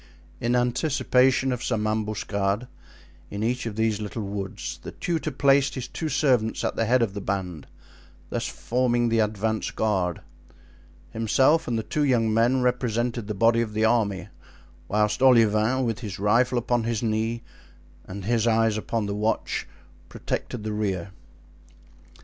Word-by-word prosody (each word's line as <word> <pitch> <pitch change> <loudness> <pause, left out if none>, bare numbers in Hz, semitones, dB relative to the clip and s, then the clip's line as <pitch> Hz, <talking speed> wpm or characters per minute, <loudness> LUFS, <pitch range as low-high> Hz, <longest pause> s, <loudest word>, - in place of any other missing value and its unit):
In 120 +1 0
anticipation 130 +1 +2
of 125 -1 -3
some 110 -3 -1
ambuscade 105 0 -1 0.6
in 100 +1 -4
each 120 +1 -1
of 110 - -5
these 110 -1 0
little 105 +1 -4
woods 100 -1 -5
the - - -8
tutor 165 -3 -2
placed 140 0 +3
his 130 -2 -4
two 160 - -4
servants 125 -8 +1
at - - -1
the 115 - 0
head 125 +2 +3
of 100 -4 -2
the 100 - -5
band, 95 -6 -4 0.6
thus - - -2
forming 120 -1 0
the 115 0 +2
advance 110 0 0
guard. 95 -6 -1 0.9
Himself 130 +8 +2
and 120 -2 0
the 110 - -2
two 150 +7 -1
young 115 -5 +2
men 120 +3 +3
represented 120 -2 -1
the 105 - -3
body 115 +3 +3
of 110 -2 -3
the 110 +1 +2
army, 100 -6 +1 0.6
whilst 105 +3 +1
Olivain, 115 0 +4
with 115 -2 -2
his 105 -6 -6
rifle 120 +5 +2
upon 120 0 0
his 115 0 -1
knee 110 +1 -1 0.6
and 95 0 -7
his 115 0 +1
eyes 115 -1 +3
upon 110 0 -2
the 100 - -3
watch, 105 +2 -1 0.4
protected 120 -4 -4
the 110 0 -3
rear. 95 -3 -2
115 Hz, 155 wpm, -25 LUFS, 105-125 Hz, 0.9 s, Olivain